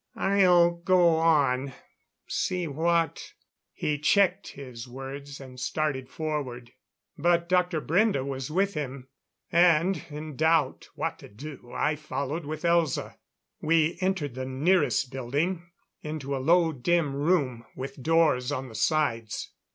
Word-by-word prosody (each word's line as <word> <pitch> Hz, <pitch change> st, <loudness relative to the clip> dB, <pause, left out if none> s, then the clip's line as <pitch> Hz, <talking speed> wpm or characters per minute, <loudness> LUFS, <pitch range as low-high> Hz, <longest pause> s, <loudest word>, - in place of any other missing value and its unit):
"I'll 180 Hz, -3 st, +4 dB
go 170 Hz, -1 st, +4 dB
on 140 Hz, -5 st, +2 dB, 0.5 s
see 180 Hz, -1 st, -1 dB
what 165 Hz, +3 st, 0 dB, 0.2 s
" -, -, -67 dB, 0.2 s
He 150 Hz, -1 st, -2 dB
checked 195 Hz, +4 st, +3 dB
his 125 Hz, -3 st, -9 dB
words, 135 Hz, +2 st, -8 dB
and 130 Hz, -2 st, -11 dB
started 135 Hz, -2 st, -2 dB
forward. 135 Hz, -7 st, -4 dB, 0.5 s
But 170 Hz, +2 st, +2 dB
Dr. 180 Hz, -2 st, +2 dB
Brende 175 Hz, -3 st, +2 dB
was 135 Hz, 0 st, -4 dB
with 195 Hz, +5 st, +1 dB
him, 135 Hz, -3 st, -5 dB, 0.4 s
and 175 Hz, +2 st, +4 dB
in 150 Hz, 0 st, -7 dB
doubt 160 Hz, -2 st, +1 dB
what -, -, -3 dB
to -, -, -12 dB
do 120 Hz, +2 st, -10 dB
I 150 Hz, -, 0 dB
followed 145 Hz, +1 st, -4 dB
with 155 Hz, +2 st, -5 dB
Elza. 170 Hz, -4 st, +1 dB, 0.4 s
We 160 Hz, +1 st, +2 dB
entered 185 Hz, -8 st, -1 dB
the 130 Hz, +1 st, -5 dB
nearest 140 Hz, -1 st, +1 dB
building, 150 Hz, +8 st, -2 dB, 0.3 s
into 150 Hz, -2 st, -4 dB
a 135 Hz, -, -3 dB
low, 165 Hz, +3 st, +4 dB
dim 150 Hz, +2 st, +1 dB
room, 140 Hz, -6 st, 0 dB
with 135 Hz, +1 st, -7 dB
doors 155 Hz, -4 st, +2 dB
on 135 Hz, -2 st, -3 dB
the -, -, -12 dB
sides. 115 Hz, -3 st, -1 dB
150 Hz, 135 wpm, -27 LUFS, 135-170 Hz, 0.5 s, I'll